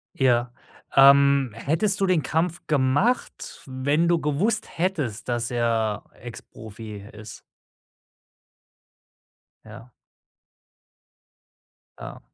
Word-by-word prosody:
Ja. 120 -2 +1 0.4
Ähm, 140 -1 +6
hättest 165 - 0
du 195 - +2
den 175 -5 +1
Kampf 165 +2 -2
gemacht, 150 - -1
wenn 140 +5 0
du 170 - +3
gewusst 185 +11 -2
hättest, 145 - -2
dass 120 -1 -2
er 115 -3 -1
Ex-Profi 110 -3 -11
ist? 110 0 -11 2.2
Ja. 115 +3 -13 2.1
Ja. - - -9
135 Hz, 85 wpm, -24 LUFS, 115-165 Hz, 2.2 s, Ähm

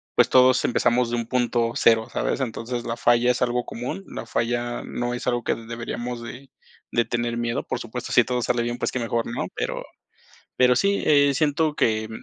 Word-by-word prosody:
pues, - - +4
todos 130 0 +5
empezamos 120 0 +2
de - - 0
un 115 -1 -3
punto 120 -2 +1
cero, 115 -1 +4
¿sabes? 135 - -1
Entonces, 120 0 -3
la 115 0 -3
falla 120 +1 +3
es 125 - -3
algo 125 0 0
común, 130 +11 -5
la - - -7
falla 120 +1 -2
no 120 0 -3
es 120 - -5
algo 120 -1 0
que - - 0
deberíamos 120 +1 -5
de 130 +3 -9 0.4
de 120 -1 +2
tener 120 0 -2
miedo. 120 0 -1
Por - - -3
supuesto, 120 +1 -6
sí 125 - +6
todo 125 -1 -1
sale 120 0 0
bien, 120 +1 -3
pues - - -2
qué 130 - -2
mejor, 115 0 -1
¿no? 120 - -3
Pero - - -3 0.7
pero 125 -1 +4
sí, 200 +7 +2
eh, 145 -2 +5
siento 150 +1 +1
que 110 -4 +1
120 Hz, 200 wpm, -24 LUFS, 115-125 Hz, 0.7 s, sí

